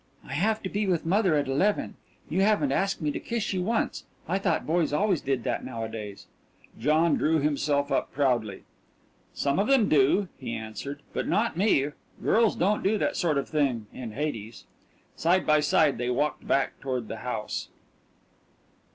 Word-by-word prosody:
"I 135 - -6
have 215 +9 0
to - - -2
be 205 +1 -1
with 175 -4 0
mother 185 -1 +3
at 145 -2 +1
eleven. 185 +11 +1 0.3
You 180 +4 0
haven't 215 +7 +3
asked 195 -3 0
me 150 - +1
to - - -4
kiss 230 -4 -2
you 185 - -1
once. 225 +5 -1 0.2
I 185 +4 0
thought 180 -5 0
boys 165 -1 +1
always 190 +2 +1
did 135 -3 -1
that 125 -3 -2
nowadays." 110 -3 -6 0.5
John 155 +6 +3
drew 160 +1 +2
himself 145 -1 0
up - - 0
proudly. 120 -8 0 0.7
"Some 140 +4 0
of 205 - +2
them 265 -6 +4
do," 150 +7 +4
he 120 -4 -4
answered, 125 +6 -6
"but - - -2
not 225 -1 +1
me. 170 -7 +2 0.3
Girls 225 -1 +3
don't 205 +4 +1
do 210 +3 +2
that - - 0
sort 160 -5 +1
of 140 - -1
thing 135 -8 0
in 120 -4 -7
Hades." 115 -5 -4 0.5
Side 175 +3 +2
by 155 0 +4
side 150 -1 +3
they 125 0 -1
walked 145 +4 -1
back 135 -1 +1
toward 130 -4 -3
the 110 - -5
house. 110 -3 -4
150 Hz, 175 wpm, -27 LUFS, 130-190 Hz, 0.7 s, them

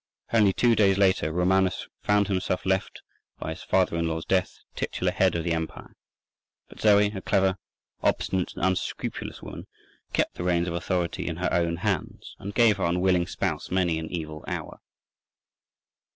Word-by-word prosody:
Only 105 -4 +5
two 120 +4 +3
days 100 -3 +4
later 95 -5 +3
Romanus 90 +2 +1
found 105 -1 +2
himself 95 -2 -1
left, 95 0 -1 0.3
by 80 - -4
his 80 +3 -7
father 95 -3 +1
in 85 0 0
law's 80 0 -3
death, 95 -1 0 0.2
titular - - -1
head - - +2
of 85 - -1
the 85 0 0
empire. 80 -1 -5 0.7
But - - -15
Zoe, 105 -1 +5
a 95 - -4
clever, 95 -1 +1 0.4
obstinate, 95 -2 0
and - - -1
unscrupulous 95 -1 -3
woman, - - -8 0.4
kept - - 0
the - - -3
reins 90 -1 +1
of 85 - -2
authority 85 0 -2
in 85 - -2
her 90 +2 -1
own 85 -1 +1
hands, 95 -1 -3
and 100 - -5
gave 115 -4 +5
her 95 - -2
unwilling 90 0 +2
spouse - - -2
many 90 -3 +1
an 80 - -5
evil 80 -3 -5
hour. - - -5
90 Hz, 165 wpm, -26 LUFS, 85-95 Hz, 0.7 s, Only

